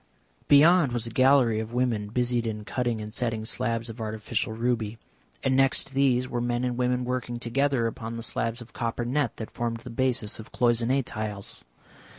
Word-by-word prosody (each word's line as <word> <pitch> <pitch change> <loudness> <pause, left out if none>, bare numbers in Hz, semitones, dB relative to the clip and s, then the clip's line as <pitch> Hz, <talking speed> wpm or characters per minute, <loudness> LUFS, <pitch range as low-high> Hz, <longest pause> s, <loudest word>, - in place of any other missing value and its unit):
Beyond 150 -1 +6
was 120 -1 -1
a 115 - -6
gallery 130 -3 +4
of 110 +1 -5
women 120 -5 0
busied 120 0 0
in 105 -1 -4
cutting 120 -2 -1
and 105 0 -7
setting 115 -3 -2
slabs 115 -1 -1
of 115 0 -7
artificial 110 0 -2
ruby, 115 -1 -1 0.5
and 130 - +2
next 135 0 +2
these 130 -2 +2
were 120 -2 -2
men 120 0 -1
and 125 -1 -1
women 125 0 0
working 125 -1 -2
together 130 +1 +1
upon 115 0 -4
the 115 - -5
slabs 115 +1 -1
of 110 - -20
copper 115 +1 -2
net 130 -1 0
that 110 - -6
formed 115 -1 -3
the 125 - -9
basis 120 -3 0
of 110 - -10
cloisonné 120 +2 +2
tiles. 105 -3 -5
120 Hz, 180 wpm, -27 LUFS, 115-125 Hz, 0.5 s, Beyond